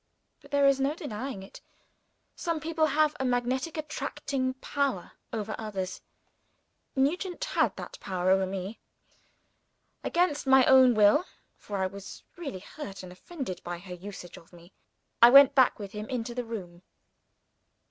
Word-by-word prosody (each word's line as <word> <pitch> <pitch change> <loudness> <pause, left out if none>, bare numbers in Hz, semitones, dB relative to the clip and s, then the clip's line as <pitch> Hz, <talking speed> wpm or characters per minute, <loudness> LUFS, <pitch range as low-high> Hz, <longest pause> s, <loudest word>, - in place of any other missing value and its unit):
But, - - -17
there 285 -1 +3
is 275 -1 +4
no 275 +3 +1
denying 260 - -5
it, 195 - -13 0.7
some 335 -3 -2
people 315 0 +1
have 305 0 +2
a - - -1
magnetic 255 +5 -1
attracting 275 -3 -3
power 265 -7 -2 0.2
over 215 -1 -3
others. 195 -4 -4 0.9
Nugent 350 - 0
had - - +1
that - - -9
power 185 -1 -1
over 190 0 +3
me. 195 +3 -5 1.2
Against 340 -5 0
my 265 -1 +6
own 260 -2 +7
will 215 - +5 0.3
for 205 - -6
I 190 - +1
was 200 +1 -8
really 280 - -6
hurt 200 -3 -9
and 180 - -9
offended 185 - -7
by 175 0 -5
her 180 +1 -9
usage 180 0 -9
of 165 - -17
me 175 +1 -17 0.5
I 235 - +10
went 275 +1 +8
back 260 -2 +4
with 200 -2 -7
him 210 +1 -7
into 240 -2 -3
the 245 0 -3
room. 180 -7 -7
245 Hz, 150 wpm, -28 LUFS, 195-280 Hz, 1.2 s, I